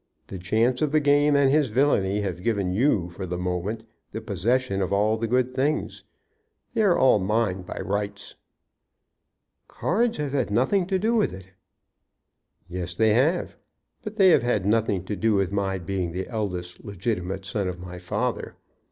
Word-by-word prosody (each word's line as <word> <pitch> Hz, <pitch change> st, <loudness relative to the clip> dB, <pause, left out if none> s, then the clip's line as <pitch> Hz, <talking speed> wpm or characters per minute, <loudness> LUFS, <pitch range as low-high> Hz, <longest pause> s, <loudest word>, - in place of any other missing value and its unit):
The 95 Hz, -, -6 dB
chance 115 Hz, +7 st, +1 dB
of 150 Hz, -2 st, +1 dB
the 155 Hz, -, +4 dB
game 145 Hz, 0 st, +3 dB
and 140 Hz, -1 st, +4 dB
his 150 Hz, -1 st, +3 dB
villany 105 Hz, -5 st, +1 dB
have 90 Hz, -3 st, -4 dB
given 100 Hz, -4 st, 0 dB
you 100 Hz, -6 st, +1 dB
for 90 Hz, +2 st, -6 dB
the 90 Hz, +1 st, -3 dB
moment 90 Hz, +5 st, -3 dB, 0.3 s
the -, -, -3 dB
possession 110 Hz, +1 st, 0 dB
of 95 Hz, -, -1 dB
all 105 Hz, +2 st, +2 dB
the 115 Hz, +1 st, -2 dB
good 125 Hz, +2 st, +1 dB
things. 140 Hz, +4 st, -2 dB, 0.7 s
They 230 Hz, -, +1 dB
are 195 Hz, -5 st, +4 dB
all 130 Hz, -5 st, +5 dB
mine 100 Hz, -1 st, 0 dB
by 90 Hz, -, -8 dB
rights." 100 Hz, +1 st, -3 dB, 1.3 s
"Cards 235 Hz, +1 st, 0 dB
have 150 Hz, -2 st, -3 dB
had 135 Hz, -5 st, 0 dB
nothing 135 Hz, -, +1 dB
to 190 Hz, 0 st, +1 dB
do 220 Hz, +5 st, 0 dB
with 220 Hz, -3 st, +1 dB
it." 95 Hz, 0 st, -11 dB, 1.2 s
"Yes; 90 Hz, -1 st, -5 dB
they 110 Hz, -1 st, +3 dB
have. 150 Hz, +10 st, +1 dB, 0.5 s
But 215 Hz, -1 st, -6 dB
they 195 Hz, -3 st, +6 dB
have -, -, +5 dB
had 115 Hz, -5 st, 0 dB
nothing 105 Hz, -3 st, +1 dB
to 105 Hz, -, -3 dB
do 110 Hz, +1 st, +1 dB
with 95 Hz, -2 st, +1 dB
my 100 Hz, -1 st, -1 dB
being 90 Hz, -1 st, -3 dB
the 95 Hz, +1 st, -4 dB
eldest 90 Hz, -6 st, -4 dB
legitimate 95 Hz, -2 st, -3 dB
son 100 Hz, 0 st, -2 dB
of 90 Hz, -1 st, -5 dB
my 90 Hz, 0 st, -8 dB
father. 90 Hz, -, -3 dB
105 Hz, 175 wpm, -25 LUFS, 95-130 Hz, 1.3 s, they